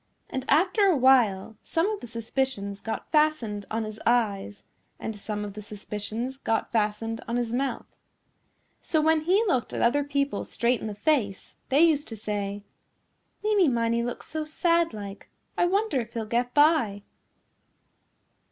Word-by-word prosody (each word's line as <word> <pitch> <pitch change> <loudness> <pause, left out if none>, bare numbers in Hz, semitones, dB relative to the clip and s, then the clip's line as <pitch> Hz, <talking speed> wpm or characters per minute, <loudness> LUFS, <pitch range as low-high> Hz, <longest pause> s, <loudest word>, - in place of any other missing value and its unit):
And 260 -1 -3
after 370 +7 +4
a 370 -6 +4
while 230 -6 +3
some 330 +3 0
of 425 - -3
the - - -9
suspicions 230 -3 -3
got 225 - -5
fastened 300 -10 +1
on 225 +1 -1
his 215 0 -7
eyes 205 -4 0 0.4
and 220 - -4
some 210 0 -4
of 205 - -7
the 210 - -7
suspicions 210 +5 -5
got 225 -4 -1
fastened 225 +1 -1
on 235 - -2
his 240 -1 -2
mouth. 270 +2 -1 0.9
So 315 - 0
when 315 0 +3
he 385 +6 +4
looked 260 - 0
at - - -2
other 285 +5 +3
people 280 0 -1
straight 240 +1 0
in - - -4
the 210 - -5
face 210 -6 0
they 280 +4 +5
used 310 -3 +3
to 225 - -7
say, 205 -1 -3 0.8
"Meeny 415 -5 +4
Miney 235 -2 +1
looks 240 +1 -4
so 315 0 -2
sad 335 +2 +1
like 200 -2 -8 0.3
I 350 - +3
wonder 395 -5 +1
if 230 -1 -6
he'll 225 -1 -2
get 240 +3 0
by." 290 -10 +3
240 Hz, 160 wpm, -26 LUFS, 215-305 Hz, 0.9 s, they